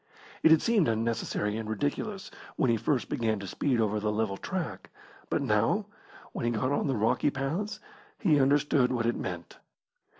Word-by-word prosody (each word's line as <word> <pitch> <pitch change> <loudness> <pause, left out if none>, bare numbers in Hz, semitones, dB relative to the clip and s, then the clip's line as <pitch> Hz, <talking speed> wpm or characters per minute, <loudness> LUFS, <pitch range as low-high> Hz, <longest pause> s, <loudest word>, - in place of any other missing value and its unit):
It - - +6
had 160 -1 +6
seemed 220 -8 +3
unnecessary 110 -2 -1
and 110 -1 -5
ridiculous 145 - -3 0.2
when 130 - +2
he - - +3
first 120 +4 0
began 110 -2 0
to 100 - -7
speed 125 +6 0
over 105 -1 +1
the 105 0 0
level 105 -2 -1
track, 185 - -5 0.4
but - - 0
now, - - +2 0.5
when - - -5
he 120 - +2
got 120 +3 0
on 145 - 0
the 135 - 0
rocky 110 +6 +2
paths, 170 +11 -3 0.4
he 155 -9 +3
understood 140 -1 +3
what 120 -3 0
it 120 - +1
meant. 90 -2 -6
125 Hz, 175 wpm, -29 LUFS, 110-145 Hz, 0.5 s, It